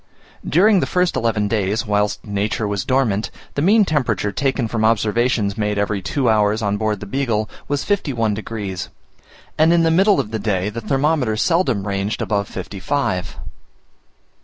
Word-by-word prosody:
During 195 +4 +5
the - - -1
first 180 -1 +1
eleven 110 -3 0
days, 105 +1 0
whilst 105 -1 0
nature 105 +2 -1
was 100 -2 -2
dormant, 120 -6 +1 0.2
the 140 - -1
mean 205 +6 +5
temperature 115 - 0
taken 135 0 -1
from 110 0 -2
observations 110 -1 +1
made 105 -1 0
every 100 -1 -1
two 130 +7 -1
hours 110 0 +2
on 100 0 0
board 105 -2 -1
the - - -5
Beagle, 110 -2 -1 0.2
was 145 -1 -1
51 130 - 0
degs.; 100 -4 -5 0.7
and 160 +2 +5
in 170 -1 +4
the 165 - +3
middle 195 +4 +4
of 105 - -3
the 110 - -2
day 100 -2 -1
the 115 +2 -6
thermometer 135 -1 0
seldom 130 - +1
ranged 100 +2 -2
above 100 -2 -1
55 95 0 -2
degs. - - -11
110 Hz, 165 wpm, -20 LUFS, 105-140 Hz, 0.7 s, During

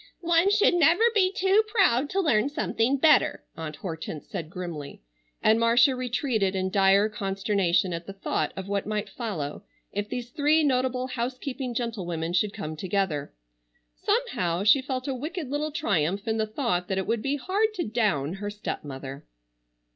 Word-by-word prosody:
"One 340 +3 +4
should 415 -2 +4
never 345 +4 +4
be 375 -4 +3
too 390 +2 +3
proud 360 - +3
to 390 - -1
learn 275 - +2
something 270 -2 0
better," 310 +3 +4
Aunt 155 -2 -6
Hortense 160 -4 -6
said 160 -2 -5
grimly, 170 - -7 0.4
and 220 +1 +5
Marcia 240 +3 +4
retreated 245 -6 -1
in 190 0 -1
dire 195 +1 +4
consternation 195 -3 0
at 170 0 -6
the 195 - -6
thought 195 - -2
of 190 0 -6
what 200 0 -2
might 215 0 -2
follow 180 - -4 0.3
if 205 +1 -3
these 245 -1 -5
three 305 +3 +3
notable 255 -2 +1
housekeeping 255 +1 -4
gentlewomen 175 -9 -3
should 200 +3 +2
come 160 -7 -6
together. 175 -4 -2 0.6
Somehow 170 - -1
she 240 +6 +6
felt 260 0 -4
a 270 - -1
wicked 300 +2 -5
little 300 +1 -1
triumph 200 - 0
in 220 0 0
the 220 0 0
thought 215 -7 -1
that 190 - -1
it 190 - -1
would 230 -1 -1
be 275 +3 0
hard 395 - 0
to 355 - -1
down 205 - 0
her 205 - -2
stepmother. 140 -9 -6
220 Hz, 165 wpm, -26 LUFS, 185-275 Hz, 0.6 s, she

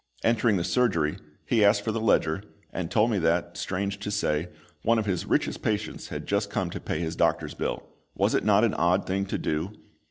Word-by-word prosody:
Entering 115 -2 +3
the 85 - -1
surgery, 90 -6 +1 0.3
he 115 -3 +3
asked 105 0 +4
for 110 - -1
the 110 0 -2
ledger, 90 -5 +2 0.3
and 90 -3 -3
told 110 +5 +3
me 105 - +1
that, 85 +1 +1
strange 100 +2 -3
to 100 - -4
say, 80 -5 0 0.3
one 115 +1 +3
of 110 - 0
his 95 -4 -1
richest - - 0
patients 105 -1 -2
had - - -6
just 100 0 0
come 95 -4 -2
to - - -5
pay 80 - -3
his 80 -1 -3
doctor's - - +1
bill - - -3 0.3
was - - +2
it - - +2
not 105 0 +4
an 115 - +3
odd 90 +3 +2
thing 95 +1 -1
to - - -2
do? 80 +6 -2
100 Hz, 215 wpm, -27 LUFS, 85-105 Hz, 0.3 s, asked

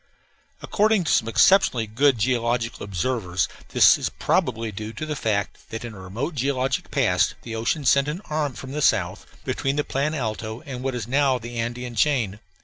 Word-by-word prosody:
According 215 -2 +2
to - - 0
some 115 - +3
exceptionally 125 - +4
good 125 +5 +2
geological 120 0 0
observers, 95 -2 -1 0.2
this - - +6
is - - -1
probably 115 0 0
due 105 +2 -6
to 155 - -5
the 155 -1 -3
fact 105 -6 -2
that 115 +1 -5
in 115 - -7
a 100 - -11
remote 110 - -4
geologic 135 -1 -1
past - - +2
the 115 -1 -6
ocean 115 +6 -1
sent 140 +2 +4
in 150 +2 -2
an 200 - -13
arm 150 -3 -1
from 130 +2 -8
the 150 +2 -3
south, - - +1 0.2
between 135 +1 -1
the 145 - +1
Plan 145 +3 -1
Alto 110 -3 -4
and 130 -3 -7
what 130 -1 -2
is 115 -3 -4
now 135 0 +2
the 120 0 -7
Andean 120 +1 -3
chain. 115 -6 +1
125 Hz, 190 wpm, -24 LUFS, 110-140 Hz, 0.2 s, this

